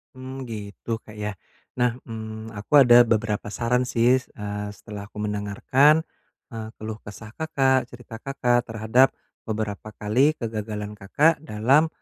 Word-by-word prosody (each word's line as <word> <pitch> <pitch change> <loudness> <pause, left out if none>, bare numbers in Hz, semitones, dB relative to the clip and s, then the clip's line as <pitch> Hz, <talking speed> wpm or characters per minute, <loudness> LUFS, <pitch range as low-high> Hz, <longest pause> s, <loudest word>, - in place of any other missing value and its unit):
Hmm 130 +1 -7
gitu 110 +1 -5
Kak 110 - -12
yah, 105 -1 -3 0.4
nah, 120 -1 +2
hmm, 110 -1 -7
aku 105 +4 -8
ada 120 -1 +7
beberapa 110 -2 0
saran 125 +4 0
sih, 125 +2 +4
eee, 105 -4 -6
setelah 100 -2 -9
aku 105 0 -6
mendengarkan, 105 +9 +3 0.5
eee, 110 -1 -6
keluh 110 0 -6
kesah 105 +2 -11
Kakak, 135 -4 +1
cerita 120 -2 -11
Kakak 120 -2 0
terhadap 110 +4 +3 0.3
beberapa 110 -1 -3
kali 130 +9 +2
kegagalan 105 -3 -5
Kakak 150 +12 +3
dalam, 135 +4 +3
115 Hz, 135 wpm, -24 LUFS, 105-125 Hz, 0.5 s, ada